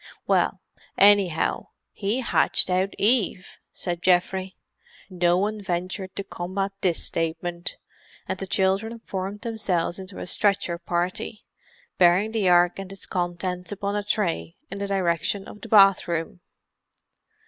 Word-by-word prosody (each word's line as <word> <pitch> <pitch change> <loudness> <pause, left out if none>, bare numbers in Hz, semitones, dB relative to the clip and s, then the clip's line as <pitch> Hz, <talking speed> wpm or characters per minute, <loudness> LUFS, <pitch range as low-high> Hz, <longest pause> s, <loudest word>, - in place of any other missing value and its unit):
"Well, - - +1 0.4
anyhow, 200 -5 +4 0.2
he 215 +5 -1
hatched 235 - +2
out 185 +2 +1
Eve!" 205 -4 +1
said 175 -2 -4
Geoffrey. 185 +1 +1 0.6
No 175 -1 +2
one 210 +2 -1
ventured 185 +1 -3
to 200 - -3
combat 195 +1 -3
this 175 -3 +1
statement, 170 +1 -3 0.5
and 190 - -3
the 195 - -5
children 195 +5 +1
formed 195 +2 -4
themselves 195 -6 -1
into 190 0 -8
a - - -5
stretcher 200 -2 +1
party, 180 +5 -3 0.5
bearing 185 +4 +5
the 215 -5 +1
Ark 175 +1 +4
and 195 -1 -7
its 195 - -8
contents 180 0 -3
upon 200 0 -2
a 205 - 0
tray 170 - -1 0.2
in 195 - -5
the 200 - -2
direction 195 0 0
of 210 - -11
the - - -9
bathroom. 195 -3 +4
190 Hz, 135 wpm, -25 LUFS, 175-200 Hz, 0.6 s, bearing